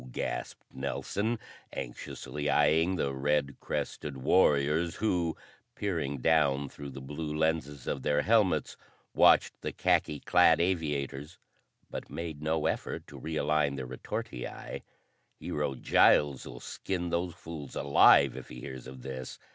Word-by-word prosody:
gasped - - -4
Nelson, 100 - -2 0.4
anxiously 70 +4 -5
eyeing 80 +5 +3
the 70 -6 -1
red 70 +1 0
crested 70 -2 -4
warriors 75 +2 +3
who, 90 -6 0 0.4
peering 80 -8 -2
down 70 -1 +2
through 70 +1 -8
the 70 - -8
blue 75 +3 -5
lenses 75 -4 -1
of 70 - -2
their 75 +2 +1
helmets, 110 -4 +2 0.4
watched - - +5
the - - -3
khaki 75 - +1
clad 90 0 +5
aviators 75 -4 -1 0.5
but - - -6
made 80 -3 -5
no 80 0 0
effort - - -2
to - - -11
realign 75 -2 0
their 65 -2 -4
retortii. 60 -1 -6 0.6
"Hero 70 - -2
Giles'll 65 -2 +3
skin 90 -3 -4
those 85 0 -1
fools 80 -5 -8
alive 70 -2 +6
if 65 - -9
he 60 - -9
hears 65 0 -8
of 65 -1 -10
this. 65 -2 -6
75 Hz, 130 wpm, -30 LUFS, 70-80 Hz, 0.6 s, alive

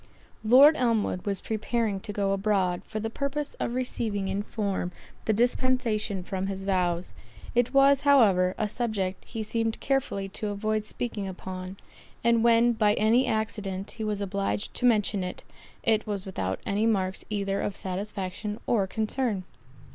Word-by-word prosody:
Lord 270 +8 +8
Elmwood 225 -6 0
was 200 -2 -1
preparing 220 -1 -1
to 205 - -6
go 200 -1 0
abroad, 195 -3 +1
for 215 - -4
the 225 +1 -3
purpose 280 +3 -3
of 235 - -2
receiving 220 -6 -2
in 195 +1 -1
form, 200 -4 -2 0.3
the - - +2
dispensation 230 -4 +1
from 190 +1 -3
his 195 0 -4
vows; 180 -2 0 0.4
it 240 0 +2
was, 275 0 +5
however, 205 -11 +5
a 215 - 0
subject 205 -5 -2
he 225 -2 -5
seemed 225 +1 -1
carefully 265 -8 -1
to 210 +2 -4
avoid 215 +1 -1
speaking 215 -3 -4
upon; 185 0 -7 0.5
and 235 -1 +4
when 235 0 +5
by 210 -2 +3
any 230 +5 +3
accident 205 -3 -2
he 220 - -6
was 210 -1 -1
obliged 200 +1 -2
to 250 - +2
mention 210 -4 +2
it, 180 - -5 0.4
it 220 -1 +2
was 200 -3 -3
without 95 - -3
any 210 +3 +1
marks 190 -4 0
either 200 -2 -1
of 200 - -2
satisfaction 200 +2 -4
or 205 -5 +2
concern. 220 0 -1
210 Hz, 155 wpm, -27 LUFS, 195-230 Hz, 0.5 s, Lord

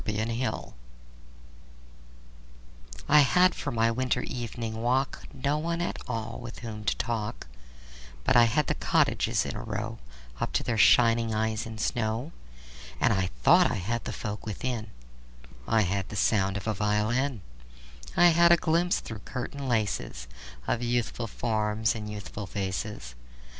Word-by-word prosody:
Good 110 +2 -2
Hours - - -3 2.3
I 150 - +7
HAD 180 +5 +5
for - - -4
my 115 0 +2
winter 125 +1 0
evening 115 -2 -4
walk 130 +3 0
No 145 +3 -1
one 170 +2 -2
at 175 - -2
all 115 -3 -4
with 120 -1 -9
whom 110 -2 -6
to - - +2
talk, 110 -3 -3 0.8
But - - +2
I 120 -1 +8
had 130 +6 +1
the - - 0
cottages - - +1
in - - -4
a - - -5
row 110 +2 -4 0.4
Up - - -2
to - - +1
their 115 -2 -1
shining 115 0 +5
eyes 110 0 -1
in 110 -1 -7
snow. 115 +6 -1 0.7
And - - +3
I 95 -2 0
thought - - +6
I - - -1
had 115 +5 -3
the - - -3
folk 105 -2 -5
within: 110 +1 -3 0.8
I 110 0 +3
had 95 0 -1
the - - -6
sound 100 -1 +2
of 100 - -6
a 110 - 0
violin; 105 +4 0 0.7
I 175 0 +8
had 170 +1 +5
a 170 - +7
glimpse 170 +2 +1
through 110 -2 -7
curtain 135 +4 -5
laces 105 - -1 0.4
Of 120 - 0
youthful 120 -1 -1
forms 110 -1 0
and 105 -2 -6
youthful 105 -1 -6
faces. 95 - -4
115 Hz, 155 wpm, -28 LUFS, 105-125 Hz, 2.3 s, I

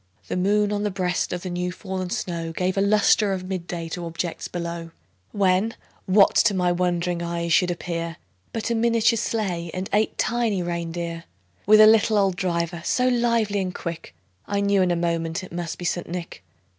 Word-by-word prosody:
The - - -1
moon, 205 +3 +2
on 205 0 -1
the 210 - 0
breast 185 -2 -1
of 180 -1 -4
the 185 - -4
new 180 0 -2
fallen 185 0 -5
snow, 170 -3 -3
Gave 185 +2 -1
a 195 - +1
lustre 205 0 +3
of 185 -1 -4
mid 185 -2 -5
day 170 -2 -4
to 175 +1 -5
objects 170 +1 -4
below; 170 -1 -5 0.4
When, 195 +2 +2 0.3
what 195 +1 +5
to 205 -3 +4
my 180 -1 +2
wondering 175 -1 0
eyes 170 0 -1
should 180 - +4
appear, 170 -1 -4 0.3
But 225 +1 -3
a - - +3
miniature 230 0 +3
sleigh, 195 -7 -2
and 185 +1 -4
eight 215 +1 +1
tiny 225 -5 0
rein 170 -1 -3
deer, 170 0 -5 0.4
With 215 +1 +7
a 215 - +10
little 220 0 +5
old 195 -2 +2
driver, 170 -2 -2
so 250 +6 +2
lively 235 -4 +1
and 185 -2 -3
quick, 170 -1 -6 0.3
I 200 0 0
knew 200 -1 +3
in 185 - +2
a 175 - +2
moment 170 0 -1
it 185 - -10
must 170 -2 -4
be 175 - -7
St. 175 0 -2
Nick. 170 - -6
180 Hz, 195 wpm, -24 LUFS, 170-205 Hz, 0.4 s, a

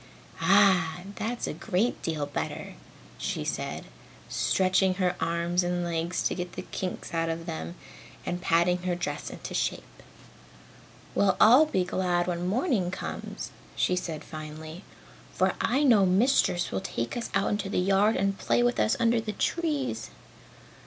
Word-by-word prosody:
"Ah, 175 -3 +4 0.2
that's 235 +3 -2
a - - -3
great 215 +3 -1
deal 155 -3 -2
better!" 145 - -4 0.5
she - - -2
said, - - -3 0.4
stretching 185 0 +2
her 180 -1 +1
arms 170 +2 0
and 175 0 -1
legs 170 +1 -1
to - - +1
get 180 0 -5
the 185 - -6
kinks 185 -1 -5
out 165 0 0
of 165 0 -3
them, 170 0 -5 0.5
and 175 0 -3
patting 175 +2 +3
her 180 -1 -1
dress 175 - -4
into - - -8
shape. - - -3 1.1
"Well, 195 -2 +3
I'll 255 +8 +7
be 190 -11 0
glad 180 -1 0
when 175 0 -2
morning 220 - +1
comes!" 185 - -6 0.2
she 180 - +2
said 165 -4 -4
finally, 155 +3 -8 0.5
"for - - +2
I 275 +4 +2
know 220 -9 +5
Mistress 185 -2 +3
will 95 - -2
take 115 0 -3
us 240 - -3
out 200 +1 +1
in 195 - -5
the - - -1
yard 195 +4 +3
and 195 +1 +1
play 240 - +2
with 245 0 +1
us 220 - +2
under 235 -1 +3
the 215 -1 -4
trees." 305 -3 -1
180 Hz, 155 wpm, -28 LUFS, 170-210 Hz, 1.1 s, I'll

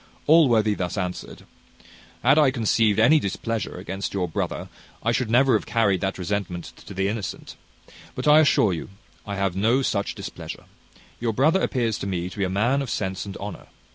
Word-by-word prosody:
Allworthy 120 -10 +5
thus 90 0 -3
answered: 90 -2 -5 0.8
"Had 140 +5 +5
I 150 -3 +5
conceived 115 -4 +2
any 125 +8 +5
displeasure 115 -1 -3
against 95 +2 -5
your 90 -2 0
brother, 80 - -3 0.4
I 115 - +2
should 120 -1 -1
never 130 +3 +4
have 110 - 0
carried 100 -5 +2
that 95 0 -2
resentment 90 -2 -4
to - - -8
the 95 +1 0
innocent: 105 -2 -5 0.6
but - - -3
I 150 +1 +8
assure 125 -10 +4
you 80 - -6 0.4
I 100 - -3
have 95 -2 -1
no 115 +7 +2
such 100 -5 -1
displeasure. - - -8 0.6
Your 115 -1 -1
brother 155 - +3
appears 115 -4 0
to - - -4
me 90 -1 -3
to - - -11
be - - +1
a 95 - 0
man 120 +9 +1
of 135 - -4
sense 95 -1 -3
and 100 - -7
honour. 100 -2 -8
105 Hz, 185 wpm, -24 LUFS, 95-120 Hz, 0.8 s, I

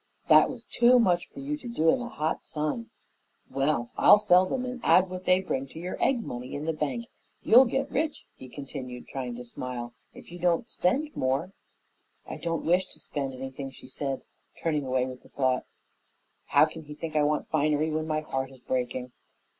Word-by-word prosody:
"That - - +7
was - - -7
too 245 +1 +5
much 180 -7 +2
for - - -10
you 290 +2 -2
to 270 - -10
do 165 -9 +2
in - - +1
the 245 -1 -5
hot 155 -5 -2
sun. 155 +10 -3 0.6
Well, 135 -3 0
I'll - - +9
sell 185 -3 +4
'em 255 -1 -1
and 250 -1 -5
add 185 0 +5
what 185 0 -6
they 185 +1 +4
bring 135 -7 -2
to 160 - -10
your 180 +2 -3
egg 250 -4 +2
money 125 - -6
in 145 +2 -4
the 160 - 0
bank. 155 +10 -2 0.4
You'll 250 +4 +8
get 270 +3 -1
rich," 305 +2 -1
he 130 - -12
continued, 130 -3 -7
trying 125 -3 -4
to 125 - -7
smile, 120 0 -6 0.2
"if - - -14
you 175 - -8
don't 175 +5 +1
spend 290 +13 0
more." 135 +8 0 0.8
"I - - -6
don't 165 -1 -3
wish 180 +3 +3
to - - -19
spend 135 -2 -4
anything," 135 +1 -6
she 135 - -14
said, 135 0 -4 0.4
turning 150 -4 -1
away 130 0 +1
with 130 -1 -8
the - - -19
thought, 130 -2 0 0.8
"How - - +5
can 160 -1 -9
he 150 0 -9
think 155 0 -6
I 150 - +4
want 150 +1 +1
finery 155 0 +1
when 155 0 -1
my 155 -1 0
heart 135 -3 -3
is 135 - -14
breaking?" 125 0 -2
155 Hz, 200 wpm, -28 LUFS, 130-185 Hz, 0.8 s, I'll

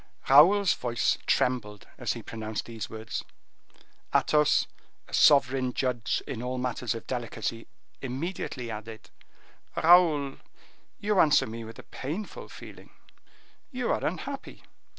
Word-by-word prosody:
Raoul's 180 +7 +7
voice 120 -1 0
trembled 110 -5 0
as - - -1
he - - -8
pronounced 110 -1 -5
these 115 -2 -6
words. 110 0 -5 0.9
Athos, 150 -1 +4 0.4
a - - -16
sovereign 135 -4 +4
judge 120 -5 -1
in 125 -5 -5
all 125 +1 -3
matters 125 -2 -2
of 115 - -7
delicacy, 120 -2 -4 0.3
immediately 135 -2 -4
added, 110 +1 -9 0.6
"Raoul, 160 -5 +5 0.6
you 205 -1 +1
answer 150 -3 +5
me 115 +1 -7
with 115 0 -10
a - - -10
painful 165 +11 -6
feeling; - - -12 0.8
you 250 -4 -2
are - - -1
unhappy." - - -5
125 Hz, 120 wpm, -28 LUFS, 115-150 Hz, 0.9 s, Raoul's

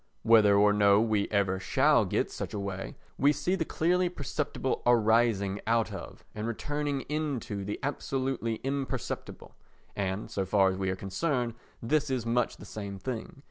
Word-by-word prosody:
Whether 110 -3 +6
or 105 0 +5
no 100 -1 +5
we 110 -2 +1
ever 95 -2 +1
shall 95 - +3
get - - -1
such - - -5
a - - -2
way, 95 -1 -5 0.2
we 140 +2 +5
see 150 +5 -1
the 190 -4 +1
clearly 180 +3 +1
perceptible 145 -4 -3
arising 110 -4 +3
out 115 0 +1
of - - -9
and 110 +1 -4
returning 145 +4 -2
into 140 -10 -3
the 105 +2 -4
absolutely 135 -4 -2
imperceptible 135 0 -4 0.4
and, 95 +1 -3
so 95 - -1
far 95 0 +3
as - - -3
we 95 -1 0
are 95 - -1
concerned, 120 - -1 0.3
this 150 +4 +1
is 130 -3 -1
much 120 +1 0
the - - -11
same 100 -2 -6
thing. 115 +4 -5
115 Hz, 165 wpm, -29 LUFS, 100-140 Hz, 0.4 s, Whether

